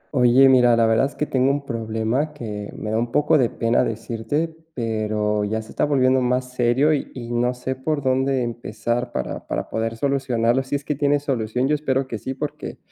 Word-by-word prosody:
Oye, 125 +2 +6
mira, 125 -2 +5
la 115 - +4
verdad 110 +4 +3
es 140 - -13
que 150 - -1
tengo 130 -1 +1
un 140 0 -1
problema 115 +5 -2
que 105 -7 -6
me 105 - -4
da 110 - +1
un 120 0 -2
poco 150 +1 +3
de 120 -3 +3
pena 115 +1 +1
decirte, 115 +8 -3 0.2
pero 110 -2 -1
ya 110 +2 -1
se 110 - -14
está - - +1
volviendo 130 -2 +3
más 125 +1 0
serio 125 +5 +3
y 145 - -3
y 120 -2 -7
no 120 +1 +1
sé, 130 +1 -4
por 145 +2 -2
dónde 130 0 +1
empezar 120 +1 -3
para 65 - -4
para - - -3
poder 115 0 -2
solucionarlo. 130 -2 +1
Si 135 +2 -3
es 140 - -3
que 150 - 0
tiene 145 0 +2
solución. 125 -3 -1
Yo 150 - +1
espero 135 -3 0
que 115 -4 -5
sí, 130 +4 -5
porque 150 +2 -5
125 Hz, 210 wpm, -22 LUFS, 115-135 Hz, 0.2 s, Oye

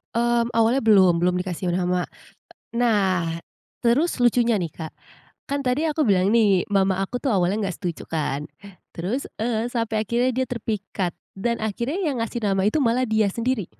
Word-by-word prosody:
Mmm, 235 0 +1
awalnya 230 +3 +2
belum, 185 -6 +5
belum 180 0 +2
dikasih 180 -1 -3
nama. 180 0 0 0.7
E 235 - -8
nah, 195 -7 +2 0.6
terus 255 +4 +2
lucunya 240 -1 +3
nih, 175 -6 -1
Kak, 160 0 -8 0.6
kan 280 0 0
tadi 250 +4 +1
aku 300 -3 0
bilang 195 -1 +3
nih, 210 -5 +4
mama 195 -1 +2
aku 245 +6 -3
tuh 260 -6 0
awalnya 185 +3 +1
nggak 185 - -3
setuju 175 -4 -5
kan, 150 -2 -2 0.5
terus, 200 +11 -3 0.2
eee, 230 -1 0
sampai 230 -3 -2
akhirnya 245 +3 +1
dia 260 0 0
terpikat 205 -6 -3 0.2
dan 235 +4 -1
akhirnya 235 - -2
yang 260 -6 -1
ngasih 230 0 -4
nama 195 -1 +1
itu 215 - +2
malah 250 -2 +2
dia 220 -1 +2
sendiri. 230 0 -1
220 Hz, 170 wpm, -23 LUFS, 185-240 Hz, 0.7 s, belum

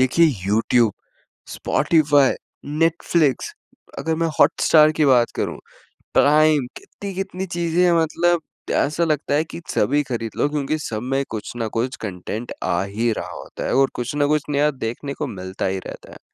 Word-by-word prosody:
देखिए 130 +6 +4 0.2
YouTube, 115 +1 +3 0.6
Spotify, 145 -4 +3 0.3
Netflix, 165 - +1 0.5
अगर 160 0 -1
मैं - - +3
हॉटस्टार 155 -1 +5
की - - +5
बात 125 -3 +4
करूँ, - - -2 0.6
प्राइम, 150 -2 +4
कितनी-कितनी 195 - -6
चीज़ें 170 0 0
हैं, 175 - +4
मतलब 175 +2 +1
त - - -46 0.3
ऐसा 155 +4 +1
लगता 150 -3 0
है 155 - +2
कि 165 - -9
सभी 145 +7 +2
खरीद 115 -2 -3
लो - - +2
क्योंकि 150 0 -1
सब 110 -6 -4
में 135 +2 0
कुछ 110 -2 -5
न 115 -1 -1
कुछ 125 +3 -1
कॉन्टेंट 105 +4 -5
आ 85 +2 +1
ही 110 +4 -1
रहा - - -5
होता - - -8
है, - - 0
और 135 0 +4
कुछ 125 +3 -4
न 145 -1 +3
कुछ 150 0 +2
नया 145 +1 +2
देखने 135 +1 -5
को 150 - -2
मिलता 95 -6 -5
ही 95 0 -1
रहता - - -10
है। - - -12
145 Hz, 170 wpm, -21 LUFS, 120-160 Hz, 0.6 s, हॉटस्टार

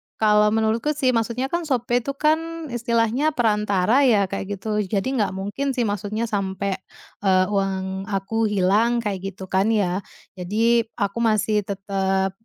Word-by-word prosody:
Kalau 210 -1 +4
menurutku 225 +7 +1
sih, 265 -3 +2
maksudnya 235 +3 -1
kan 340 -1 -2
Shopee 245 -2 +1
itu 275 +3 -5
kan, 320 0 -1
istilahnya 240 +5 +1
perantara 210 -1 +2
ya, 210 -5 +4
kayak 195 +1 -3
gitu. 210 +1 -2
Jadi 200 +6 -1
nggak 205 - +1
mungkin 210 +8 -3
sih, 245 - +1
maksudnya 205 +1 -2
sampai, 200 -3 -2 0.5
eee, 185 -1 +4
uang 190 -1 -2
aku 210 +2 -1
hilang, 210 +4 +2
kayak 195 -2 -4
gitu 190 - -9
kan, 190 +2 +2
ya. 185 -3 +1 0.4
Jadi, 225 +5 +2
aku 200 0 -2
masih 215 -2 +2
tetep, 195 -1 -1
210 Hz, 150 wpm, -23 LUFS, 195-235 Hz, 0.5 s, Kalau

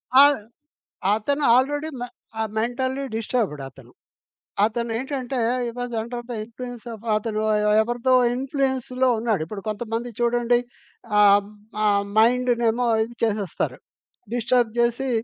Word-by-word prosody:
ఆ! 270 - +10 0.9
అతను 280 +7 -1
ఆల్రెడీ 290 +4 +1
మె 245 - -4 0.3
ఆహ్, 220 - -1
మెంటల్లి 260 +4 -1
డిస్టర్బ్‌డ్ 220 - -1
అతను. 130 -2 -17 0.7
అతనేంటంటే, 245 +4 -2 0.3
హి - - -2
was 245 0 -4
under 240 +2 -5
the - - -2
influence 245 +1 -9
of 225 0 -10
అతను 215 0 -2 0.4
ఎవరిదో 240 +3 +1 0.2
ఇన్‌ఫ్లు‌యెన్స్‌లో 260 -1 0
ఉన్నాడు. 220 -6 0
ఇప్పుడు 200 +3 -7
కొంతమంది 225 +2 -3
చూడండి 240 0 +2 0.6
ఆహ్, 205 0 +5 0.4
ఆహ్, 200 -1 +3
మైండ్‌నేమో 240 0 +3 0.2
ఇది 230 +2 -5
చేసేస్తారు. 210 -4 -2 0.6
డిస్టర్బ్ 240 -1 +1
జేసి, 235 +3 +1
240 Hz, 115 wpm, -23 LUFS, 220-250 Hz, 0.9 s, ఆ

